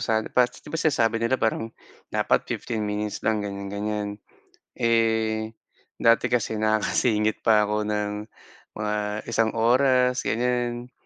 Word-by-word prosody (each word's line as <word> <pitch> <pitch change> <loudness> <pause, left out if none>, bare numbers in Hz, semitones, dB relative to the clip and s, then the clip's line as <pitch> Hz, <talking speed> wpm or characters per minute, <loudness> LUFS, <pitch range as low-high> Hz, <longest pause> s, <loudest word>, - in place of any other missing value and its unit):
sana 110 -1 0
par 125 -1 +4
'di 125 - -15
ba 165 - -1
sinasabi 115 -7 +2
nila 115 +3 +2
parang 110 0 -1 0.4
dapat - - +1
15 110 -3 -3
minutes 105 0 -3
lang, 110 -1 0
ganyan-ganyan. 100 +1 -4 0.6
Eh, 115 -2 +1 0.4
dati 115 +2 +3
kasi 115 -3 -1
nakakasingit 110 0 +1
pa 110 -2 +4
ako 105 0 -1
ng 105 -1 -1 0.6
mga 105 0 -2 0.4
isang 115 0 +1
oras, 125 +2 +3
ganyan. 120 +1 -1
110 Hz, 125 wpm, -25 LUFS, 105-120 Hz, 0.6 s, par